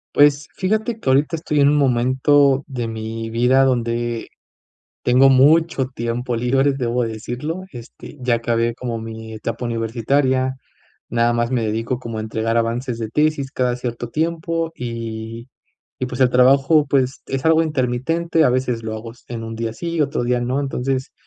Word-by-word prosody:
Pues 145 Hz, 0 st, +4 dB
fíjate 220 Hz, +4 st, -1 dB
que 130 Hz, -, 0 dB
ahorita 145 Hz, +5 st, +2 dB
estoy 150 Hz, -2 st, -1 dB
en 140 Hz, 0 st, +5 dB
un 150 Hz, -, +3 dB
momento 135 Hz, +1 st, +3 dB
de 120 Hz, -4 st, -3 dB
mi 115 Hz, 0 st, -5 dB
vida 125 Hz, +4 st, +3 dB
donde 120 Hz, -2 st, -1 dB, 0.7 s
tengo 130 Hz, +2 st, +5 dB
mucho 140 Hz, +1 st, +4 dB
tiempo 120 Hz, +1 st, -2 dB
libre, 135 Hz, +4 st, +2 dB
debo 125 Hz, -2 st, -1 dB
decirlo, 120 Hz, +10 st, -5 dB
este, 120 Hz, +3 st, -11 dB
ya 125 Hz, -2 st, +2 dB
acabé 115 Hz, 0 st, 0 dB
como 120 Hz, -2 st, -4 dB
mi 110 Hz, 0 st, -8 dB
etapa 115 Hz, +3 st, -4 dB
universitaria, 130 Hz, +3 st, 0 dB, 0.5 s
nada 120 Hz, 0 st, +2 dB
más 120 Hz, 0 st, 0 dB
me 125 Hz, -3 st, 0 dB
dedico 115 Hz, +3 st, -2 dB
como 115 Hz, -3 st, -6 dB
a -, -, -3 dB
entregar 110 Hz, +1 st, -1 dB
avances 115 Hz, +1 st, -1 dB
de 110 Hz, -1 st, -4 dB
tesis 150 Hz, -1 st, +1 dB
cada 125 Hz, -1 st, 0 dB
cierto 120 Hz, -1 st, -5 dB
tiempo 165 Hz, +1 st, -1 dB
y 115 Hz, -1 st, -6 dB, 0.5 s
y 130 Hz, -, 0 dB
pues 125 Hz, +1 st, -6 dB
el 125 Hz, -, +4 dB
trabajo 135 Hz, +4 st, +4 dB
pues 135 Hz, -1 st, 0 dB
es 135 Hz, 0 st, -3 dB
algo 160 Hz, 0 st, +5 dB
intermitente, 155 Hz, +4 st, 0 dB
a -, -, +5 dB
veces 125 Hz, -2 st, -1 dB
lo 110 Hz, 0 st, -3 dB
hago 115 Hz, +1 st, -8 dB
s 120 Hz, -, -22 dB
en 115 Hz, -2 st, -5 dB
un 115 Hz, 0 st, -6 dB
día 115 Hz, -1 st, -3 dB
sí, 170 Hz, +2 st, -3 dB
otro 140 Hz, -4 st, 0 dB
día 125 Hz, 0 st, +1 dB
no, 125 Hz, +3 st, -1 dB
entonces, 135 Hz, -1 st, -2 dB
125 Hz, 170 wpm, -20 LUFS, 115-140 Hz, 0.7 s, en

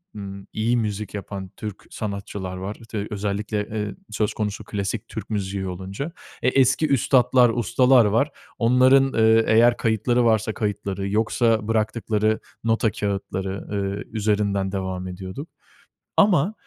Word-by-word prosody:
ımm, 100 Hz, -1 st, -8 dB
iyi 115 Hz, +3 st, +1 dB
müzik 105 Hz, -3 st, -3 dB
yapan 100 Hz, -1 st, -6 dB
Türk 105 Hz, -3 st, -7 dB
sanatçılar 100 Hz, -3 st, -5 dB
var, 95 Hz, +3 st, -5 dB
işte, 110 Hz, -2 st, -5 dB
özellikle, 105 Hz, 0 st, -2 dB
ııı, 105 Hz, -2 st, -4 dB, 0.2 s
söz 105 Hz, 0 st, 0 dB
konusu 105 Hz, -1 st, -3 dB
klasik 105 Hz, +2 st, -3 dB
Türk 110 Hz, -3 st, -7 dB
müziği 100 Hz, -2 st, -2 dB
olunca. 95 Hz, +7 st, -5 dB, 0.4 s
Eee, 130 Hz, -, +4 dB
e 135 Hz, -, +2 dB
eski 145 Hz, +4 st, +3 dB
üstatlar, 125 Hz, -2 st, +4 dB
ustalar 120 Hz, +1 st, +4 dB
var. 115 Hz, +8 st, +2 dB, 0.3 s
Onların, 130 Hz, +3 st, +5 dB
ııı, 110 Hz, 0 st, +5 dB
eğer 120 Hz, +2 st, +5 dB
kayıtları 120 Hz, +2 st, +1 dB
varsa 110 Hz, -1 st, +2 dB
kayıtları, 100 Hz, -2 st, -3 dB
yoksa 110 Hz, 0 st, +1 dB
bıraktıkları 110 Hz, -1 st, 0 dB, 0.2 s
nota 115 Hz, -1 st, +2 dB
kâğıtları, 100 Hz, -2 st, -3 dB
ııı, 100 Hz, 0 st, -2 dB
üzerinden 100 Hz, -3 st, 0 dB
devam 95 Hz, -1 st, -3 dB
ediyorduk. 95 Hz, -, -7 dB, 0.7 s
Ama 195 Hz, -2 st, +4 dB
105 Hz, 135 wpm, -23 LUFS, 100-115 Hz, 0.7 s, Onların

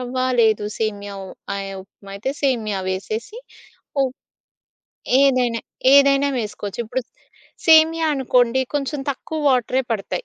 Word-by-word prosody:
రవ్వ 250 Hz, +1 st, -6 dB, 0.3 s
లేదు 215 Hz, -2 st, +2 dB
సేమియా 205 Hz, -2 st, -3 dB
వు 190 Hz, -, -9 dB, 0.3 s
అయి 195 Hz, 0 st, -5 dB
ఉప్మా 195 Hz, +1 st, -16 dB
అయితే 260 Hz, +7 st, -3 dB
సేమియా 220 Hz, -7 st, 0 dB
వేసేసి 215 Hz, -, -4 dB, 0.7 s
ఉప్ 260 Hz, 0 st, -3 dB, 1.1 s
ఏదైనా 250 Hz, -4 st, +2 dB, 0.3 s
ఏదైనా 280 Hz, 0 st, +5 dB
వేసుకోవచ్చు. 210 Hz, -1 st, -5 dB
ఇప్పుడు 255 Hz, +4 st, -3 dB, 0.6 s
సేమియా 320 Hz, 0 st, +6 dB
అనుకోండి 250 Hz, -1 st, +2 dB
కొంచెం 285 Hz, 0 st, -2 dB
తక్కువ 315 Hz, +3 st, -5 dB
వాటరే 255 Hz, +1 st, +1 dB
పడతాయి. 195 Hz, -4 st, -3 dB
245 Hz, 115 wpm, -21 LUFS, 210-275 Hz, 1.1 s, సేమియా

